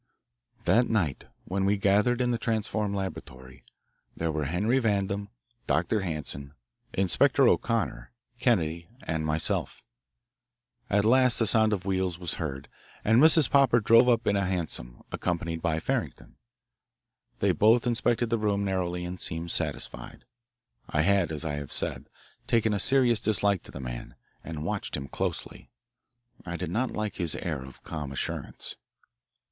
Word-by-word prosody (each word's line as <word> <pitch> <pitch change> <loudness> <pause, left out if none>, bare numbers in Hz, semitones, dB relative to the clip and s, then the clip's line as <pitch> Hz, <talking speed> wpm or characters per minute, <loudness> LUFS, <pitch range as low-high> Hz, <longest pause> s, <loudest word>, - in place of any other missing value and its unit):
That 120 +2 +3
night, 90 -11 0 0.2
when 95 +1 -1
we 100 +1 +2
gathered 105 +5 +2
in 125 -1 +1
the 120 - -1
transformed 110 -2 -1
laboratory, 65 -10 -7 0.5
there 80 -1 -1
were 75 -1 -2
Henry 105 - +1
Vandam, 100 -3 -1 0.4
Dr. 85 +9 +1
Hanson, 75 -5 -5 0.4
Inspector 95 -4 +3
O'Connor, - - 0 0.3
Kennedy, 85 -9 0
and 80 -1 -2
myself. 80 +1 -1 1.0
At 100 +1 +2
last 125 +1 +4
the 115 - +2
sound 110 0 +3
of 95 -3 -2
wheels 95 -3 -1
was 90 -1 -4
heard, 70 -4 -4 0.4
and 115 +4 +5
Mrs. 160 -2 +7
Popper 135 -4 +4
drove 115 +3 +5
up 120 -1 +2
in 100 - +2
a 100 - +1
hansom, 80 -10 -3
accompanied 85 -2 -2
by 80 -2 0
Farrington. - - -4 1.0
They - - +2
both 115 +3 +4
inspected 120 -1 +1
the 115 - +1
room 100 -1 0
narrowly 90 -2 -2
and 90 +1 -6
seemed 80 +1 -3
satisfied. - - -3 0.6
I 75 - +1
had, 95 -1 +2
as 80 0 -3
I 75 - -2
have 70 -2 -7
said, - - -3 0.4
taken 110 -2 +2
a 100 - 0
serious 120 -1 +3
dislike 100 -4 +2
to - - -10
the - - -8
man, - - -7 0.3
and 80 -2 -6
watched - - -3
him 70 +1 -6
closely. - - -4 0.7
I 85 -1 -5
did 90 -2 -4
not 120 +6 0
like 105 -2 -4
his 85 -4 0
air 75 -6 -3
of 65 -1 -13
calm 75 -4 -5
assurance. 70 - -4
95 Hz, 150 wpm, -28 LUFS, 80-110 Hz, 1.0 s, Mrs